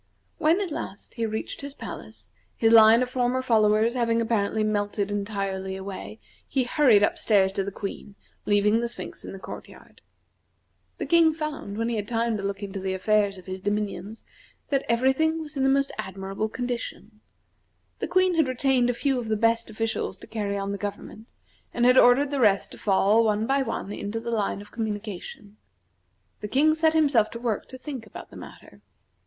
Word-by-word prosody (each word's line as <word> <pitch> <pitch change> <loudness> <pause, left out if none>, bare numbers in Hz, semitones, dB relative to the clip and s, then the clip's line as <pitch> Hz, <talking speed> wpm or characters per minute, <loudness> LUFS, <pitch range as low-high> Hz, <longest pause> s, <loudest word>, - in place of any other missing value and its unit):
When 325 +3 +3
at 375 -5 -3
last, 200 -8 -6
he 230 -2 -2
reached 220 0 -5
his 280 0 -7
palace, 105 -5 -9 0.3
his 225 -1 +3
line 225 +2 +8
of 250 - -4
former 255 0 0
followers 220 -1 +3
having 230 -2 +1
apparently 220 -2 0
melted 205 -1 -1
entirely 195 -2 -3
away, 190 - -7 0.3
he 265 -2 0
hurried 245 -5 +4
up - - +1
stairs 195 -3 +3
to 195 0 -1
the 200 - -4
Queen, 200 +1 -7 0.3
leaving 210 +2 +3
the 235 0 -2
Sphinx - - -7
in - - -7
the 195 - -8
court 190 - -9
yard. - - -17 1.0
The - - -3
King 330 -2 +4
found, 300 -10 -5
when 230 +1 -1
he 235 -1 -1
had 205 -1 -3
time 230 0 0
to - - -5
look 200 0 -4
into 195 0 -5
the 190 0 -2
affairs 205 0 +1
of 185 - -13
his 185 0 -6
dominions, 205 +1 -3 0.5
that 275 -2 +1
every 250 +3 +3
thing 315 +3 +1
was 310 -1 -7
in 270 - -1
the 270 - +3
most 275 0 +2
admirable 195 +3 -4
condition. 235 -3 -5 0.8
The - - -2
Queen 370 +2 +3
had 320 -4 +2
retained 255 -1 +2
a 245 - 0
few 270 0 0
of 235 - -5
the 215 -1 0
best 230 +1 +1
officials 220 -3 -2
to - - -12
carry 205 -2 -3
on 200 0 -3
the 200 - -4
government, 210 +2 -7 0.5
and 240 - +2
had 250 +1 +7
ordered 270 +4 +5
the 285 - -1
rest 200 -3 +3
to - - -12
fall, 205 +2 +3
one 215 0 +1
by 275 +3 +2
one, 205 -6 -4
into 205 +3 -4
the 235 +1 -5
line 205 -3 -1
of 205 - -18
communication. 210 -2 -6 0.8
The 210 - -5
King 295 +7 +3
set 320 0 +2
himself 280 -9 +3
to 230 - -8
work 230 -4 -2
to 260 - -9
think 255 -4 -7
about - - -11
the - - -13
matter. - - -13
225 Hz, 195 wpm, -25 LUFS, 200-255 Hz, 1.0 s, line